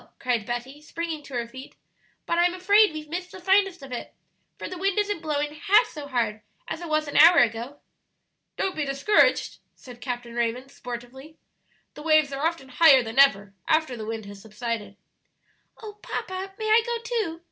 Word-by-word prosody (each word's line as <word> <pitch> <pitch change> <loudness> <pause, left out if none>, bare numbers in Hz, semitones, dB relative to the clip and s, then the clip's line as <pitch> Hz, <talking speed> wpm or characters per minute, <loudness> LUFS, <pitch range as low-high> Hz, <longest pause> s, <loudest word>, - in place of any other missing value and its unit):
cried 240 -4 -1
Betty, 250 +4 -5
springing 325 0 -5
to 275 - -9
her 235 -1 -2
feet; 260 +3 -11 0.5
"but 340 - 0
I'm 350 +1 +3
afraid 405 +2 +4
we've 310 -1 -7
missed 360 +3 -6
the 380 - -9
finest 385 -3 +2
of 270 - -10
it, 245 - -7 0.4
for - - -6
the 370 - -7
wind 390 +1 0
isn't 410 -4 0
blowing 295 -2 -2
half 415 +8 +4
so 295 -8 -9
hard 230 -5 -1 0.3
as - - -5
it 340 - -6
was 310 0 0
an 290 - -2
hour 335 +3 +8
ago." 235 +4 +1 0.8
"Don't 385 - -1
be 305 - -1
discouraged," 275 +9 +2 0.2
said 245 -2 -13
Captain 245 -2 -5
Raymond, 240 +3 -2
sportively; 250 +5 -9 0.6
"the - - -11
waves 310 -2 +3
are 275 +2 -4
often 330 -6 -5
higher 270 -1 +6
than 225 +3 -3
ever 205 -8 +4
after 315 -5 +1
the 215 -2 -7
wind 225 -1 -5
has 200 0 -11
subsided." 220 -1 -5 0.9
"Oh, 425 -1 -7
papa, 375 +1 -5
may 435 - -5
I 440 +2 +6
go 475 0 -2
too?" 445 -9 -2
295 Hz, 185 wpm, -25 LUFS, 245-350 Hz, 0.9 s, hour